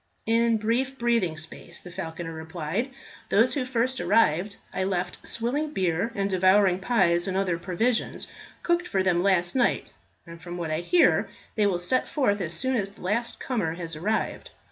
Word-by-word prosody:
"In 230 0 +3
brief 245 +5 0
breathing 230 -10 +1
space," 160 +2 -7
the 180 - -10
falconer 165 -2 -5
replied. 160 - -3 0.4
"Those 230 +5 +4
who 280 -4 -1
first 255 +1 0
arrived 200 -2 +2 0.2
I 190 - -1
left 180 -2 -3
swilling 290 +7 -2
beer, 185 +4 0
and 195 -1 0
devouring 190 0 +4
pies 185 -5 +2
and 190 0 -1
other 180 -3 0
provisions 210 +7 -1 0.4
cooked 345 +1 +1
for 190 -1 0
them 175 -2 +2
last 180 -2 +2
night, 250 -2 +1 0.3
and 170 0 -11
from 175 +1 -7
what 165 -3 -3
I 155 - 0
hear, 330 - +3 0.2
they 210 -2 +2
will 190 -3 +1
set 180 +9 +1
forth 205 -9 +1
as 170 -2 -1
soon 260 +9 +1
as 200 -3 -1
the 200 - -17
last 215 +6 -1
comer 200 -11 -2
has 165 -2 -5
arrived. 210 +8 -2
195 Hz, 175 wpm, -26 LUFS, 175-235 Hz, 0.4 s, Those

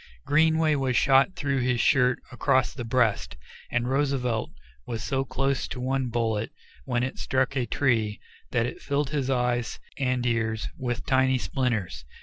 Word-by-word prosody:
Greenway 160 +1 +3
was 135 -3 +1
shot 135 +6 +4
through 140 -5 -1
this 125 -1 +1
shirt 125 0 +3
across 130 -1 +1
the 125 - -6
breast, 115 - 0 0.3
and 125 0 0
Roosevelt 130 -4 0 0.4
was 115 -2 -4
so 135 0 0
close 135 0 -1
to - - -6
one 130 +1 -1
bullet, 115 -2 -1 0.4
when 120 0 0
it 130 - -4
struck 130 +1 0
a 125 -3 0
tree, 115 -6 +1 0.3
that 120 -2 +1
it 125 - -6
filled 140 0 -1
his 140 -3 -1
eyes 125 -2 0 0.2
and 125 -2 0
ears 110 -2 0
with 125 -1 -3
tiny 130 -1 +3
splinters. 120 - -2
125 Hz, 155 wpm, -26 LUFS, 120-135 Hz, 0.4 s, shot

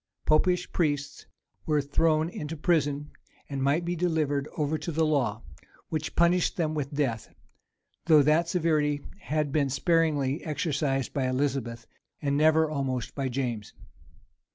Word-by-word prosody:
Popish 180 +4 +2
priests 145 -4 -1 0.4
were 150 -1 +3
thrown 155 +2 +2
into 160 -2 -6
prison, 145 -3 0 0.4
and 140 -2 -4
might 145 +5 +1
be 175 +1 -1
delivered 155 -5 0
over 150 0 0
to 170 - -4
the 160 +1 +1
law, 125 -8 0 0.5
which 155 -1 -3
punished 175 +1 +3
them 160 -3 0
with 145 -3 -3
death; 135 -7 -2 0.8
though 155 -3 +7
that 155 +4 +3
severity 155 -4 +1 0.2
had 150 -5 -1
been 140 -2 +1
sparingly 145 -1 +1
exercised 145 -3 -1
by 135 -2 0
Elizabeth, 130 -3 -2 0.3
and 140 -2 0
never 155 +2 +4
almost 135 -5 -3
by 135 -2 -2
James. 120 -5 -3
150 Hz, 135 wpm, -27 LUFS, 140-160 Hz, 0.8 s, though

